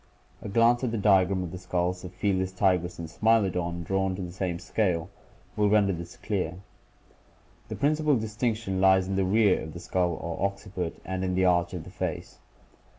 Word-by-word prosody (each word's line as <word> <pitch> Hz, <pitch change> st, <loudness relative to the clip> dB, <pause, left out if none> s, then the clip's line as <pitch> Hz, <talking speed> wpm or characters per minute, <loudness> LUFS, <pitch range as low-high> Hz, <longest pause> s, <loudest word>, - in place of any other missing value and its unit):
A -, -, -6 dB
glance 115 Hz, +4 st, +3 dB
at 125 Hz, -, +1 dB
the 115 Hz, -, -2 dB
diagram 95 Hz, -2 st, +3 dB
of 85 Hz, -, -6 dB
the 90 Hz, -, -7 dB
skulls 90 Hz, 0 st, -2 dB
of 90 Hz, -, -7 dB
Felts 95 Hz, -2 st, 0 dB
tigris 90 Hz, -2 st, +1 dB
and 85 Hz, -, -6 dB
Smilodon, 90 Hz, -3 st, +1 dB
drawn 95 Hz, +1 st, 0 dB
to 95 Hz, -, -5 dB
the 90 Hz, -, -6 dB
same 90 Hz, -1 st, -2 dB
scale 90 Hz, -2 st, -1 dB, 0.4 s
(Fig. -, -, -8 dB
183), -, -, +1 dB
will 105 Hz, -, +4 dB
render 100 Hz, -2 st, +3 dB
this 85 Hz, 0 st, -8 dB
clear. 90 Hz, -5 st, -2 dB, 1.1 s
The -, -, -5 dB
principal 150 Hz, 0 st, +2 dB
distinction 110 Hz, -3 st, -2 dB
lies 95 Hz, -1 st, +5 dB
in 95 Hz, -, -2 dB
the 95 Hz, -, +2 dB
rear 100 Hz, 0 st, +3 dB
of 80 Hz, -, -7 dB
the 85 Hz, -, -7 dB
skull 90 Hz, -1 st, 0 dB
or 85 Hz, +4 st, -2 dB
occi 100 Hz, 0 st, -14 dB
put 90 Hz, -3 st, -3 dB
and 95 Hz, 0 st, -3 dB
in 90 Hz, -1 st, -1 dB
the 95 Hz, 0 st, +3 dB
arch 85 Hz, 0 st, +2 dB
of 85 Hz, -, -5 dB
the -, -, -12 dB
face. -, -, -5 dB
95 Hz, 205 wpm, -27 LUFS, 90-105 Hz, 1.1 s, lies